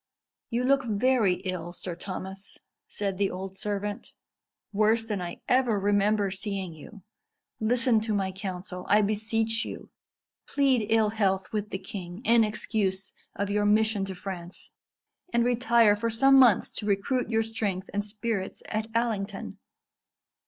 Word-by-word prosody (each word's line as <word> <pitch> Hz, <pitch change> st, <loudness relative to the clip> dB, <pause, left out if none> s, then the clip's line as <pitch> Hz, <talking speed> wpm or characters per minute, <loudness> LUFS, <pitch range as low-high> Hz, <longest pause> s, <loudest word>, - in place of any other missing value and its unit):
"You 235 Hz, +2 st, 0 dB
look 275 Hz, +1 st, +3 dB
very 225 Hz, -3 st, +2 dB
ill, 180 Hz, -3 st, -4 dB
Sir 175 Hz, -1 st, -5 dB
Thomas," 190 Hz, +2 st, -7 dB, 0.3 s
said 200 Hz, -2 st, -3 dB
the 200 Hz, -1 st, +2 dB
old 190 Hz, +1 st, -6 dB
servant; 205 Hz, 0 st, -4 dB, 0.6 s
"worse 220 Hz, +2 st, +3 dB
than 210 Hz, -4 st, -3 dB
I 175 Hz, -1 st, -6 dB
ever 245 Hz, -5 st, +3 dB
remember 205 Hz, 0 st, +2 dB
seeing 195 Hz, -2 st, -4 dB
you. 185 Hz, +6 st, -13 dB, 0.6 s
Listen 235 Hz, +1 st, +3 dB
to 215 Hz, 0 st, -2 dB
my 190 Hz, -1 st, 0 dB
counsel, 185 Hz, -1 st, -6 dB
I 210 Hz, +1 st, +5 dB
beseech 220 Hz, +2 st, 0 dB
you. -, -, -8 dB, 0.6 s
Plead 265 Hz, -6 st, +2 dB
ill 220 Hz, -1 st, +4 dB
health 195 Hz, -3 st, 0 dB
with 210 Hz, -1 st, -2 dB
the -, -, -3 dB
king 190 Hz, 0 st, -8 dB
in 230 Hz, 0 st, +5 dB
excuse 200 Hz, -2 st, -2 dB, 0.2 s
of 200 Hz, -1 st, -2 dB
your 205 Hz, 0 st, +2 dB
mission 215 Hz, -1 st, +3 dB
to 190 Hz, -1 st, -6 dB
France, 180 Hz, -2 st, -8 dB, 0.6 s
and 235 Hz, 0 st, +2 dB
retire 235 Hz, -3 st, +4 dB
for 230 Hz, +3 st, -1 dB
some 270 Hz, +4 st, +5 dB
months 240 Hz, -7 st, +5 dB
to 210 Hz, -, -3 dB
recruit 215 Hz, +5 st, 0 dB
your 225 Hz, -1 st, +2 dB
strength 205 Hz, -4 st, -2 dB
and 205 Hz, 0 st, 0 dB
spirits 210 Hz, -1 st, -4 dB
at 215 Hz, 0 st, -2 dB
Allington." 200 Hz, -, -2 dB
210 Hz, 145 wpm, -27 LUFS, 195-225 Hz, 0.6 s, I